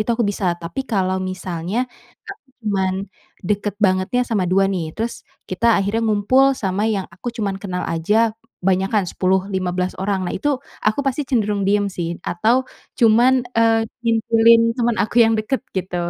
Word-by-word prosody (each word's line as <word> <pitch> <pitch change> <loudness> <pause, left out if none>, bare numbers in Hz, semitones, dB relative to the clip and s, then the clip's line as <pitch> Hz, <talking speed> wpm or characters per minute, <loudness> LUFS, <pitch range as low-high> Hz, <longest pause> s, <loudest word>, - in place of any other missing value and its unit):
itu 215 - -1
aku 235 - 0
bisa. 200 -3 0
Tapi 170 +11 -5
kalau 190 -5 0
misalnya 185 +1 -4 0.5
aku 395 -6 -10 0.2
cuman 190 -3 0 0.5
dekat 205 +2 -1
bangetnya 190 +5 +2
sama 210 -5 0
2 185 +2 +2
nih, 170 -5 -3
terus 230 +1 -4 0.2
kita 185 +5 -1
akhirnya 210 +4 -1
ngumpul 225 +6 +3
sama 200 -5 -2
yang 205 -4 -1
aku 190 +8 -7
cuma 205 -3 -1
kenal 185 -2 -4
aja 215 +7 +1 0.2
banyakan 190 +1 +1
10 190 +2 0
15 185 -1 -2
orang. 195 0 -1
Nah, - - -4
itu 275 +5 -1 0.2
aku 215 +5 +2
pasti 275 +1 -1
cenderung 210 -6 0
diem 205 +1 +2
sih 175 -3 -4
atau 230 +10 +1 0.3
cuman, 235 +2 +5 0.2
eee, 225 -1 +3 0.2
ngintilin 230 0 +4 0.2
teman 240 -2 +1
aku 215 - -2
yang 225 - +3
dekat 235 +5 -1
gitu. 185 -1 -3
205 Hz, 160 wpm, -20 LUFS, 185-230 Hz, 0.5 s, cuman